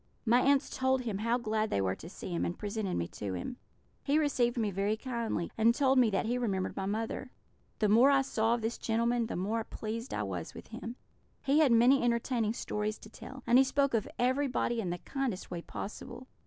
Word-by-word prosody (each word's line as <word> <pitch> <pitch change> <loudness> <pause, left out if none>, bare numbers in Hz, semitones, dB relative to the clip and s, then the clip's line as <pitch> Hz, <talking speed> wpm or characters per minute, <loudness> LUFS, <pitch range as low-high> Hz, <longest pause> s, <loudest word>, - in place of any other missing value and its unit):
"My 240 +2 +5
aunts 280 +1 +3
told 260 0 +2
him 220 -5 -3
how 230 +3 +1
glad 220 -2 -1
they - - 0
were 95 -1 +1
to 165 - -10
see 185 - -8
him, 170 - 0
and 175 - -2
presented 205 -2 -3
me 85 - -1
to 100 -3 -5
him. 170 - -5 0.4
He 285 +1 +1
received 260 -6 +1
me 215 -3 0
very 200 +3 0
kindly, 230 -8 -3
and 230 +2 +5
told 265 -1 +4
me 240 -3 +5
that 195 +2 0
he 245 +2 0
remembered 195 -6 -1
my 195 - -3
mother. 225 +5 -3 0.5
The 215 - +2
more 230 +6 +6
I 275 -1 +4
saw 230 -3 +1
of 240 - -5
this 225 +1 -2
gentleman, 235 +1 +1
the - - -4
more 215 +5 -1
pleased 230 +3 -5
I - - -1
was 90 -4 -5
with - - -10
him. 230 +1 -7 0.5
He 280 +3 +3
had 300 -5 +5
many 245 +4 +6
entertaining 235 -2 +1
stories 210 -1 -2
to 215 - -14
tell; 265 +2 -10
and 245 +2 +6
he - - +7
spoke 275 0 +1
of 225 -3 0
everybody 255 -2 +1
in 185 - -3
the 175 - -2
kindest 255 -3 -4
way 175 -1 -4
possible. 215 +7 -7
230 Hz, 220 wpm, -31 LUFS, 210-255 Hz, 0.5 s, he